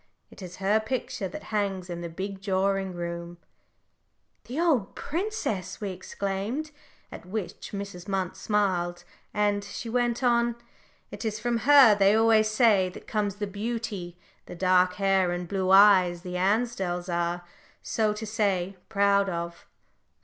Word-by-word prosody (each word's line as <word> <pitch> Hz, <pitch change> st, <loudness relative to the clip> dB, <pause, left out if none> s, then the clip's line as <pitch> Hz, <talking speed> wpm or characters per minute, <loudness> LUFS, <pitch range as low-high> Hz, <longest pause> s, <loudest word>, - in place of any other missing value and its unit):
It -, -, -14 dB
is 180 Hz, -1 st, -8 dB
her 200 Hz, +3 st, +2 dB
picture 220 Hz, -3 st, -3 dB
that 180 Hz, -, -8 dB
hangs 195 Hz, -3 st, -1 dB
in 175 Hz, -1 st, -5 dB
the 170 Hz, -, -5 dB
big 190 Hz, +3 st, -6 dB
drawing 195 Hz, 0 st, 0 dB
room 170 Hz, 0 st, -5 dB, 0.5 s
" -, -, -47 dB
"The 260 Hz, +6 st, -4 dB
old 295 Hz, -, +1 dB
princess!" 295 Hz, -, -3 dB
we 205 Hz, -2 st, -3 dB
exclaimed, 200 Hz, +10 st, -4 dB, 0.4 s
at -, -, -9 dB
which 200 Hz, -1 st, -5 dB
Mrs. 200 Hz, -3 st, -6 dB
Munt 190 Hz, -3 st, -2 dB
smiled 180 Hz, -4 st, 0 dB, 0.3 s
"and," 205 Hz, -1 st, +1 dB
she 220 Hz, +3 st, -7 dB
went 240 Hz, +1 st, 0 dB
on, 235 Hz, -1 st, +2 dB, 0.6 s
"it -, -, -7 dB
is 215 Hz, -1 st, -2 dB
from 235 Hz, +1 st, 0 dB
her, 275 Hz, -6 st, +9 dB
they 200 Hz, 0 st, +4 dB
always 220 Hz, -1 st, +4 dB
say, 215 Hz, -4 st, +3 dB
that 180 Hz, -, -12 dB
comes 205 Hz, -3 st, -1 dB
the 205 Hz, 0 st, -3 dB
beauty 205 Hz, -4 st, -4 dB, 0.3 s
the -, -, -8 dB
dark 185 Hz, 0 st, +3 dB
hair 195 Hz, -2 st, +2 dB
and 175 Hz, 0 st, -3 dB
blue 190 Hz, 0 st, -1 dB
eyes, 190 Hz, -3 st, +6 dB
the 180 Hz, -1 st, -6 dB
Ansdells 190 Hz, -2 st, 0 dB
are, 175 Hz, 0 st, -1 dB, 0.4 s
so 215 Hz, -2 st, +1 dB
to 210 Hz, +1 st, -5 dB
say, 200 Hz, -4 st, -1 dB
proud 200 Hz, -1 st, +3 dB
of. 170 Hz, -1 st, -5 dB
200 Hz, 150 wpm, -27 LUFS, 180-220 Hz, 0.6 s, her